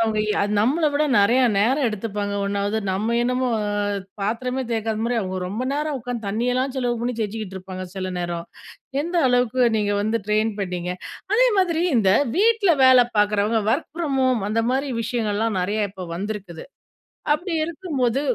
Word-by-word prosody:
அவங்க 220 -1 +1 0.2
எ - - +3 0.2
நம்மள 295 +7 +2
விட 300 +1 +2
நெறையா 245 +5 +4
நேரம் 255 +6 +2
எடுத்துப்பாங்க 205 -1 -3
ஒன்னாவது. 200 +2 -1
நம்ம 220 +5 0
என்னமோ, 250 +1 0
அ - - -2 0.6
பாத்திரமே 250 +5 -2
தேய்க்காதமாரி, 225 +1 -1
அவுங்க 185 -1 -3
ரொம்ப 230 +6 -3
நேரம் 300 -2 -2
உட்காந்து, 235 -3 -5
தண்ணியெல்லாம் 250 +5 0
செலவு 245 -2 0
பண்ணி 245 0 -1
தேய்ச்சிக்கிட்டு 210 -2 -4
இருப்பாங்க. 185 0 -7
சில 185 -1 -3
நேரம். 170 -1 -4 0.6
எந்த 345 +2 -3
அளவுக்கு 245 0 +1 0.2
நீங்க 205 -1 0
வந்து 220 +2 0
ட்ரெயின் 215 +1 +2
பண்ணீங்க? 180 -2 -3 0.4
அதே - - +5
மாதிரி 340 -3 +2
இந்த 195 -4 +4 0.3
வீட்டில 435 -4 +4
வேலை 255 -1 +7
பாக்குறவங்க, 210 +2 +2
ஒர்க் 295 - -2
ஃப்ரம் 290 -6 -1
ஹோம் 240 -6 +1
அந்தமாரி 250 +5 0
விஷயங்கள்லாம் 220 -2 -1
நறையா 210 +4 -1
இப்போ 190 -2 -8
வந்திருக்குது. 195 -4 -6 0.7
அப்பிடி 345 +4 -2
இருக்கும்போது, 295 -7 -1
230 Hz, 150 wpm, -23 LUFS, 205-260 Hz, 0.7 s, வேலை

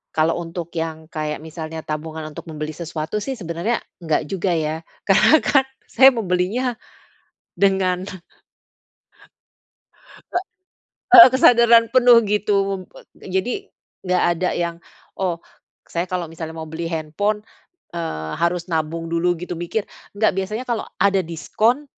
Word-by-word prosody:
kalau 160 +2 +2
untuk 170 0 -6
yang 160 -1 -4
kayak 155 -1 -3
misalnya 160 0 -7
tabungan 155 +1 -5
untuk 150 - -10
membeli 155 0 -5
sesuatu 160 +3 -4
sih 270 - -3
sebenernya 175 +6 -2 0.2
nggak 160 -2 +1
juga 190 -1 -1
ya 160 0 -2 0.3
karena 210 +10 +6
kan 270 -2 +3 0.2
saya 265 0 +7
membelinya, 215 +5 -1 0.8
dengan 190 -1 +2 2.3
E - - +3 0.7
Heeh, 230 - +12
kesadaran 235 -3 +6
penuh 245 -2 +7
gitu 210 0 0 0.2
um 185 - -6
wet - - -14 0.2
jadi, 225 - -3 0.4
nggak 180 0 +2
ada 180 +2 -1
yang, 170 -1 -2 0.4
"Oh 180 -3 0 0.5
saya 175 +2 -3
kalau 180 -1 -2
misalnya 160 0 -7
mau 160 - -5
beli 160 +1 -5
handphone, 170 +7 -2 0.5
eee, 80 - -4
harus 170 0 0
nabung 165 +1 -2
dulu 175 +1 +1
gitu 180 +2 -6
mikir." 175 +5 -2 0.3
nggak 215 +1 +3
biasanya 215 +6 -3
kalau 240 -3 -2
ada 195 -1 +3
diskon 215 - 0
175 Hz, 130 wpm, -21 LUFS, 160-210 Hz, 2.3 s, Heeh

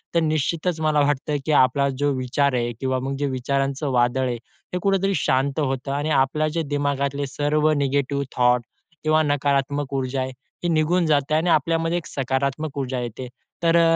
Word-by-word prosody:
तर - - +5
निश्चितच 160 +2 0
मला 155 -1 +2
वाटतं 145 +1 0
की 155 - 0
आपला 140 0 +4
जो 145 0 +2
विचार 130 +2 +1
आहे 120 -1 0
किंवा 130 -1 0
मग 135 +1 -3
जे 145 - 0
विचारांचं 135 +2 -1
वादळ 125 +1 +2
आहे, 120 -1 -2
ते 120 +9 -9
कुठेतरी 195 0 +1
शांत 135 +1 +1
होतं 135 -1 -1
आणि 145 +2 -1
आपल्या 150 +3 0
जे 165 +2 -1
दिमागातले 140 -1 -1
सर्व 150 +3 +1
नेगेटिव्ह 140 0 0
थॉट 125 -1 +3 0.4
किंवा 155 0 +3
नकारात्मक 140 -1 0
ऊर्जा 130 0 -1
आहे, 130 0 -3 0.3
ही 175 - +1
निघून 165 +2 +2
जाते 145 -1 +1
आणि 165 +3 +1
आपल्यामध्ये 165 +2 +2
एक 175 - -5
सकारात्मक 135 +2 -2
ऊर्जा 130 -1 -2
येते. 120 +2 -6 0.4
तर 165 0 +4
अ, 165 -1 +5
140 Hz, 175 wpm, -23 LUFS, 130-155 Hz, 0.4 s, तर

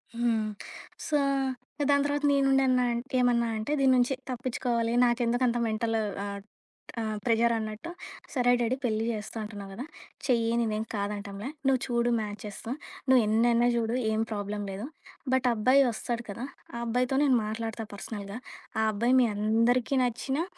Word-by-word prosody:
హ్మ్. 235 -1 +2 0.7
సో 300 - +2 0.6
ఇంక 290 - -3
దాని 280 0 +4
తర్వాత 290 0 -1
నేనుండన్నాఅంట్ 260 -3 +2
ఏమన్నా 240 -1 +3
అంటే, 215 +6 -3
దీన్నుంచి 260 -1 +4 0.2
తప్పిచ్చుకోవాలి, 240 -2 -1
నాకెందుకంత 240 0 +2
మెంటల్ 225 +1 0 0.3
ఆహ్, 200 0 -5 0.6
ఆహ్, 215 -1 -2
ప్రెజరన్నట్టు 225 +2 +1 0.4
"సరే 245 -3 +3
డాడీ 240 +1 +1
పెళ్లి 220 -2 0
జేస్తా 215 0 -5
అంటున్నావు 205 -2 -8
గదా! 245 +7 -6 0.4
చెయ్యి 230 -3 +2
నేనేం 215 -1 -1
కాదంటంలే. 200 +1 -4 0.2
నువ్వు 265 -1 +4
చూడు 240 -1 +1
మ్యాచెసు. 210 +1 -6 0.4
నువ్వెన్నైనా 235 0 +4
జూడు 230 0 0 0.2
ఏం 220 0 +1
ప్రాబ్లమ్ 205 0 -3
లేదు. 195 +4 -5 0.5
బట్ 260 -1 +2
ఆ - - +2
అబ్బాయి 255 +6 +5
వస్తాడు 235 +1 -3
కదా! 230 +6 -5 0.3
ఆ - - -3
అబ్బాయితో 250 +3 +1
నేను 270 -3 +4
మాట్లాడతా 225 +1 -4
పర్సనల్‌గా. 200 0 -6 0.4
ఆ - - +3
అబ్బాయి 235 +4 +1
మీ 245 - +4
అందరికీ 230 +5 +2
నచ్చినా, 265 +5 -1
235 Hz, 135 wpm, -28 LUFS, 215-250 Hz, 0.7 s, అబ్బాయి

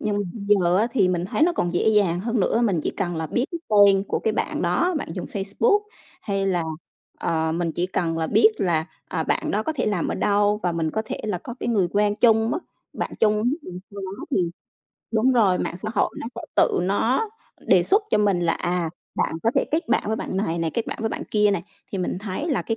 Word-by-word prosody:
Nhưng 210 -1 -1 0.2
giờ 200 -5 +2
á, 220 +3 +3
thì 205 -8 +3
mình 180 -1 0
thấy 245 - -1
nó 345 +1 +5
còn 175 - -1
dễ 200 - +2
dàng 200 -5 +3
hơn 230 +2 -1
nữa, 225 +5 +2
mình 190 -8 +1
chỉ - - -1
cần 175 -3 -2
là 160 0 -2
biết 245 - 0
cái 340 - -3
tên 200 -2 +5
của - - 0
cái 220 - 0
bạn - - -2
đó, 360 +1 +1
bạn - - -5
dùng 180 - -5
Facebook 205 - +1 0.4
hay 195 -2 -1
là, 180 -3 +1 0.6
ờ, 160 -1 0
mình 165 0 -1
chỉ 175 +2 -1
cần 165 -3 -1
là 160 - 0
biết 435 - +5
là, 160 -3 +1 0.2
à, 160 - -1
bạn - - -1
đó 210 - 0
có 315 - -2
thể 300 - -2
làm 205 -5 0
ở - - -1
đâu 205 0 +2
và 175 - 0
mình 165 -1 -1
có 220 - -1
thể - - -5
là 205 -4 -1
có 240 +6 -8
cái - - -2
người 200 -7 +2
quen 205 0 +2
chung 225 -1 +4
mất 355 - -2 0.3
bạn - - -3
chung 215 -1 +4 0.3
rồi 180 0 -7
sau 200 -1 -8
đó 190 +1 -6
thì 175 -3 +1 0.6
đúng 230 +4 +3
rồi, 205 -7 +3
mạng - - -3
xã 200 +4 -5
hội 205 - +2
nó - - -5
sẽ - - -6 0.2
tự - - +4
nó 225 - +1 0.4
đề - - +5
xuất 410 +3 +3
cho - - +3
mình 200 -4 +2
là, 170 -1 +2
à, 175 -1 -1 0.2
bạn - - 0
có 230 - +3
thể - - +3
kết 320 +3 -1
bạn - - +2
với 220 +1 0
bạn 190 - -4
này 170 -4 -1
này, 165 -1 0
kết 230 - -1
bạn - - -5
với 225 - 0
bạn - - -4
kia 210 -1 +4
này, 195 -4 -1 0.3
thì 195 - -2
mình 180 0 -2
thấy 205 - -4
là 275 - +1
cái 225 - -2
200 Hz, 250 wpm, -23 LUFS, 175-220 Hz, 0.6 s, nó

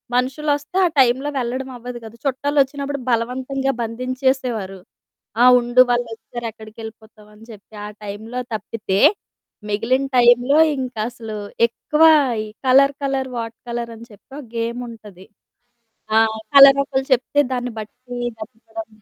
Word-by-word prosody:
మనుషులొస్తే 290 +6 -1
ఆ - - +4
టైంలో 260 +3 +3
వెళ్ళడం 260 +1 -3
అవ్వదు 245 0 -8
గదా! 225 +1 -11
చుట్టాలు 285 +2 -1
ఒచ్చినప్పుడు 280 +1 -5
బలవంతంగా 260 +3 -1
బంధించేసేవారు. 250 -4 -2 0.6
"ఆ! - - +7
ఉండు 240 +1 +4
వాళ్ళొచ్చారు 240 0 -3
ఎక్కడికెళ్ళిపోతావు?" 220 -1 -12
అని 220 +2 -16
చెప్పి 215 +1 -15
ఆ - - -5 0.2
టైంలో 220 +5 -6
తప్పితే, 210 -2 -3 0.7
మిగిలిన 230 +6 0
టైంలో 245 +4 +5 0.2
ఇంకసలు 230 -3 -5 0.3
ఎక్కువ 300 +6 0 0.4
ఈ - - -7 0.2
కలర్, 275 +2 +5
కలర్ 270 -1 -1
వాట్ 230 0 -5
కలర్ 235 0 -4
అని 230 - -12
చెప్పి 205 -1 -19
ఒక 295 - -9
గేముంటది. 230 -5 -6 0.9
ఆ! - - +7 0.4
కలరొకళ్ళు 275 -1 +6
చెప్తే 260 +3 +2
దాన్ని 250 -1 -3
బట్టి 245 +3 -9 0.2
వెతకడం. 225 -1 -9
245 Hz, 120 wpm, -20 LUFS, 225-265 Hz, 0.9 s, ఆ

